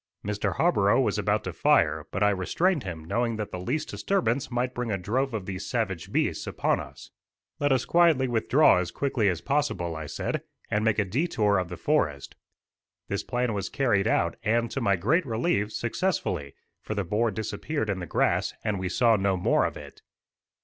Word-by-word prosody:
Mr. 105 Hz, -3 st, -1 dB
Harborough -, -, +3 dB
was -, -, +1 dB
about -, -, +1 dB
to -, -, -5 dB
fire, -, -, +2 dB
but 105 Hz, -, 0 dB
I 105 Hz, -, +5 dB
restrained 150 Hz, -, +1 dB
him, 85 Hz, -6 st, -7 dB
knowing 115 Hz, +6 st, 0 dB
that 105 Hz, -1 st, -4 dB
the 90 Hz, -, -5 dB
least 125 Hz, -, -2 dB
disturbance 140 Hz, -, 0 dB
might 125 Hz, 0 st, -1 dB
bring 125 Hz, -1 st, -3 dB
a 100 Hz, -, 0 dB
drove 125 Hz, +9 st, -1 dB
of 110 Hz, -5 st, -4 dB
these 95 Hz, 0 st, -5 dB
savage 105 Hz, -9 st, -2 dB
beasts -, -, 0 dB
upon -, -, 0 dB
us. -, -, -10 dB, 0.5 s
"Let 145 Hz, -1 st, +1 dB
us 130 Hz, -2 st, +2 dB
quietly 165 Hz, -6 st, +4 dB
withdraw 120 Hz, +1 st, +4 dB
as 90 Hz, -, -2 dB
quickly 125 Hz, -7 st, 0 dB
as 85 Hz, -3 st, -2 dB
possible," 135 Hz, -, -1 dB
I 80 Hz, -1 st, -6 dB
said, -, -, -3 dB, 0.3 s
"and 105 Hz, +1 st, +1 dB
make 110 Hz, -2 st, +2 dB
a 105 Hz, -, +2 dB
detour 105 Hz, -, +1 dB
of 90 Hz, -2 st, -3 dB
the 90 Hz, -, -6 dB
forest." 75 Hz, -, 0 dB, 0.8 s
This -, -, -1 dB
plan 125 Hz, -2 st, -1 dB
was 100 Hz, -2 st, -3 dB
carried 115 Hz, -7 st, +1 dB
out, 85 Hz, -6 st, +1 dB
and, 115 Hz, +1 st, +1 dB
to 135 Hz, -, -3 dB
my 100 Hz, -4 st, +3 dB
great 140 Hz, -, +2 dB
relief, 110 Hz, -4 st, 0 dB
successfully, 120 Hz, -, -2 dB, 0.3 s
for 110 Hz, -, -5 dB
the 100 Hz, -, 0 dB
boar 105 Hz, +6 st, +1 dB
disappeared 110 Hz, +5 st, -3 dB
in 100 Hz, -2 st, -1 dB
the 90 Hz, -, -6 dB
grass, -, -, +1 dB
and 105 Hz, -3 st, -1 dB
we 95 Hz, 0 st, -2 dB
saw 115 Hz, +4 st, +4 dB
no 95 Hz, -1 st, +1 dB
more 90 Hz, -, +2 dB
of -, -, -3 dB
it. -, -, -12 dB
110 Hz, 195 wpm, -27 LUFS, 95-130 Hz, 0.8 s, I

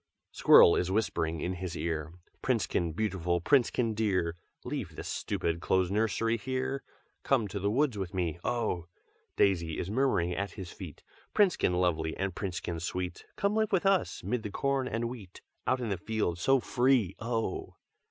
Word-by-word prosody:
"Squirrel 85 Hz, -, +7 dB
is 90 Hz, -, 0 dB
whispering 85 Hz, -6 st, 0 dB
in 90 Hz, -, -1 dB
his 90 Hz, -2 st, -5 dB
ear, 80 Hz, -2 st, -2 dB, 0.3 s
'Princekin 110 Hz, -9 st, 0 dB
beautiful, 90 Hz, -5 st, 0 dB
Princekin 120 Hz, -, +2 dB
dear, 95 Hz, -6 st, 0 dB, 0.3 s
Leave -, -, -4 dB
this -, -, -6 dB
stupid 85 Hz, 0 st, -2 dB
close 95 Hz, +2 st, +2 dB
nursery 115 Hz, +2 st, +1 dB
here, 130 Hz, +3 st, -2 dB, 0.4 s
Come 125 Hz, -6 st, +2 dB
to 100 Hz, -, -4 dB
the 100 Hz, +2 st, 0 dB
woods 125 Hz, -1 st, +1 dB
with 95 Hz, -2 st, -3 dB
me, 85 Hz, -3 st, -2 dB
oh!' 110 Hz, -8 st, -1 dB, 0.5 s
Daisy 85 Hz, -5 st, +2 dB
is 90 Hz, -, -3 dB
murmuring 110 Hz, -8 st, +1 dB
at 100 Hz, +3 st, -3 dB
his 95 Hz, -4 st, -7 dB
feet, -, -, -10 dB, 0.3 s
'Princekin 190 Hz, -, +3 dB
lovely, 80 Hz, -3 st, 0 dB
and 95 Hz, -1 st, -2 dB
Princekin 90 Hz, -3 st, -4 dB
sweet, 90 Hz, +1 st, -4 dB
Come 200 Hz, +1 st, 0 dB
live 220 Hz, -1 st, +1 dB
with 190 Hz, -1 st, +2 dB
us, 195 Hz, -1 st, +2 dB
'mid 110 Hz, +6 st, -1 dB
the 105 Hz, -, -5 dB
corn 135 Hz, +4 st, 0 dB
and 115 Hz, 0 st, -1 dB
wheat, 110 Hz, -7 st, -9 dB, 0.2 s
Out 130 Hz, -, +2 dB
in 120 Hz, -3 st, -3 dB
the 100 Hz, -, -1 dB
field 95 Hz, -3 st, -2 dB
so 135 Hz, +8 st, +4 dB
free, 125 Hz, -7 st, +2 dB
oh!' 115 Hz, -4 st, -3 dB
100 Hz, 165 wpm, -30 LUFS, 90-120 Hz, 0.5 s, Squirrel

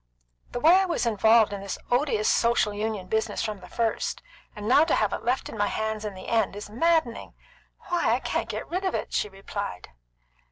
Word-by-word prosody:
"The 245 Hz, -, -3 dB
way 330 Hz, +8 st, +6 dB
I 385 Hz, -, +3 dB
was 345 Hz, -8 st, -1 dB
involved 220 Hz, -1 st, +4 dB
in 200 Hz, -, -5 dB
this 200 Hz, -1 st, -4 dB
odious 245 Hz, -4 st, +1 dB
Social 230 Hz, -3 st, +2 dB
Union 210 Hz, -2 st, -3 dB
business 220 Hz, +1 st, -1 dB
from 215 Hz, -3 st, -4 dB
the 180 Hz, -, -13 dB
first, 230 Hz, -2 st, -2 dB, 0.3 s
and 210 Hz, 0 st, -6 dB
now 270 Hz, +6 st, +6 dB
have -, -, +1 dB
it -, -, -4 dB
left 250 Hz, +2 st, 0 dB
on 220 Hz, -, -8 dB
my 205 Hz, -, +2 dB
hands 220 Hz, 0 st, -2 dB
in 205 Hz, -2 st, -5 dB
the 185 Hz, -, -10 dB
end, 225 Hz, -3 st, +1 dB
is 205 Hz, 0 st, -8 dB
maddening. 315 Hz, 0 st, 0 dB, 0.5 s
Why, 350 Hz, -1 st, +2 dB
I -, -, -2 dB
can't -, -, -2 dB
get -, -, -4 dB
rid 365 Hz, +3 st, -3 dB
of 375 Hz, -, 0 dB
it!" -, -, -4 dB
she 210 Hz, -, 0 dB
replied. 195 Hz, -, -6 dB
220 Hz, 205 wpm, -26 LUFS, 205-245 Hz, 0.5 s, way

